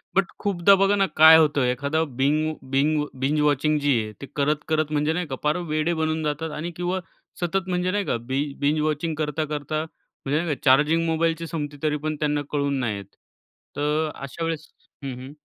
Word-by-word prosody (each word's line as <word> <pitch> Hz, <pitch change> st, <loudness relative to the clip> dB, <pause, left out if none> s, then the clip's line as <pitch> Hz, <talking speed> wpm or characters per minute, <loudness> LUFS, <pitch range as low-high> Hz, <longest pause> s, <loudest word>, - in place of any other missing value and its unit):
But 195 Hz, 0 st, +4 dB
खूपदा 200 Hz, -1 st, +4 dB
बघा 195 Hz, +1 st, +3 dB
ना, 200 Hz, -1 st, +3 dB
काय 160 Hz, +1 st, +9 dB
होतं, 150 Hz, -3 st, +3 dB
एखादा 140 Hz, +6 st, 0 dB
बिंग 150 Hz, +3 st, 0 dB, 0.2 s
बिंग 150 Hz, +2 st, +2 dB, 0.2 s
बिंज 140 Hz, +3 st, +1 dB
वॉचिंग 150 Hz, +1 st, +2 dB
जी 145 Hz, -1 st, +2 dB
आहे. 110 Hz, -, -7 dB
ते -, -, -5 dB
करत 150 Hz, +1 st, +2 dB
करत 155 Hz, -1 st, 0 dB
म्हणजे 150 Hz, +1 st, +1 dB
नाही 180 Hz, 0 st, -2 dB
का, 135 Hz, -, -4 dB
पार 150 Hz, +3 st, +2 dB
वेडे 155 Hz, +2 st, +1 dB
बनून 160 Hz, -1 st, -1 dB
जातात. 150 Hz, +1 st, -2 dB
आणि 155 Hz, +3 st, -4 dB
किंवा 180 Hz, +2 st, -1 dB, 0.4 s
सतत 180 Hz, +2 st, -1 dB
म्हणजे 180 Hz, 0 st, 0 dB
नाही 205 Hz, +1 st, -1 dB
का, -, -, 0 dB
बि 130 Hz, +4 st, -2 dB, 0.2 s
बिंज 145 Hz, +2 st, +1 dB
वॉचिंग 155 Hz, +1 st, -1 dB
करता-करता 155 Hz, 0 st, -2 dB
म्हणजे 150 Hz, -1 st, -5 dB
नाही 160 Hz, -4 st, -1 dB
का, -, -, -19 dB
चार्जिंग 150 Hz, +5 st, +4 dB
मोबाईलची 165 Hz, 0 st, 0 dB
संपते, 150 Hz, -3 st, -4 dB
तरी 150 Hz, -1 st, +1 dB
पण 155 Hz, +1 st, -3 dB
त्यांना 150 Hz, -1 st, 0 dB
कळून 140 Hz, -2 st, 0 dB
नाही 115 Hz, -5 st, -1 dB
येत. 100 Hz, 0 st, -12 dB, 0.6 s
तर 150 Hz, +2 st, 0 dB
अशा 140 Hz, +4 st, -6 dB
वेळेस 165 Hz, -2 st, -3 dB, 0.4 s
हं, 135 Hz, -2 st, -4 dB
हं. 130 Hz, +3 st, -9 dB
155 Hz, 195 wpm, -24 LUFS, 145-160 Hz, 0.6 s, काय